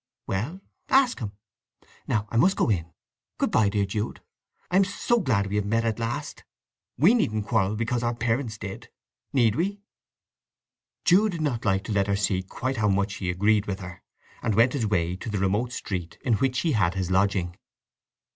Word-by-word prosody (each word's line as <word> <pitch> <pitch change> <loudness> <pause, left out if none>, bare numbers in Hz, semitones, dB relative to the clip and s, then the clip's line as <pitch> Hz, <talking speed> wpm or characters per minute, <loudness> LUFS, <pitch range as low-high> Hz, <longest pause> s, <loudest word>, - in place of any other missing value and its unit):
"Well—ask 190 - 0
him. 105 -5 -5 0.7
Now 105 0 0
I 115 - 0
must 190 +10 +4
go 115 - +2
in. 85 -4 -1 0.5
Good - - 0
bye, 105 -2 +4
dear 100 0 +1
Jude! 105 +2 -3 0.5
I 180 - +4
am 195 - +6
so 205 +4 0
glad 120 - +1
we 100 +1 -2
have 105 - 0
met 115 +2 +1
at 115 0 -1
last. 115 +1 -4 0.5
We 170 - +6
needn't 110 - +1
quarrel 100 0 +1
because 115 +2 -1
our 120 0 0
parents 115 -1 -1
did, 100 -2 -7 0.4
need 115 -6 +3
we?" 200 +6 -2 1.2
Jude 200 +3 +4
did 165 - -4
not 125 -7 -1
like 95 -1 +2
to 110 - -6
let 100 -1 +2
her 100 - +1
see 100 -2 0
quite 130 +8 -4
how 105 -1 +2
much 100 +1 0
he 95 - -3
agreed 100 +3 +2
with 95 -1 -3
her, 90 0 -9 0.4
and 110 - 0
went 115 +3 +4
his 120 -7 0
way 90 -3 0
to 105 - -6
the 105 - -2
remote 100 +6 0
street 90 -8 -5
in 125 - +3
which 130 +4 +1
he 165 - +1
had 95 - +2
his 95 -1 -2
lodging. 95 -2 +1
110 Hz, 190 wpm, -26 LUFS, 100-125 Hz, 1.2 s, am